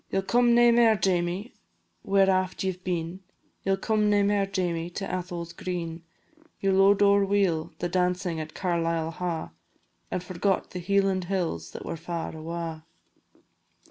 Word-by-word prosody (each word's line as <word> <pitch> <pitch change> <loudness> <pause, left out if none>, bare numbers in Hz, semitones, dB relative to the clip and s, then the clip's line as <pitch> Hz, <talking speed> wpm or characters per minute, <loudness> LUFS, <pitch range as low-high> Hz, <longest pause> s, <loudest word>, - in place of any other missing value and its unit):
"Ye - - -1
'll 195 - +1
come 240 +3 +4
nae 240 0 +6
mair, 230 -2 +5
Jamie, 185 +2 -1 0.5
where 195 0 +3
aft 185 -1 +1
ye 190 - +1
've 185 0 -13
been, 175 0 -3 0.4
Ye 195 - +2
'll - - 0
come 215 +1 +1
nae 205 -1 +4
mair, 200 -1 +2
Jamie, 175 -3 -2
to 195 +3 -5
Atholl's 175 -2 -4
green; 170 -2 -4 0.6
Ye 195 - +1
lo'ed 195 +1 +5
ower 200 0 +5
weel 195 -5 +1
the 175 - -2
dancin' 180 -1 0
at 155 0 -7
Carlisle 165 -3 -1
Ha', 165 -1 -4 0.6
And 180 - -3
forgot 185 +2 -1
the 180 - -5
Hieland 195 0 +1
hills 170 - -2
that - - -7
were - - -4
far 165 0 -5
awa'." 165 0 -5
185 Hz, 165 wpm, -27 LUFS, 170-195 Hz, 0.6 s, nae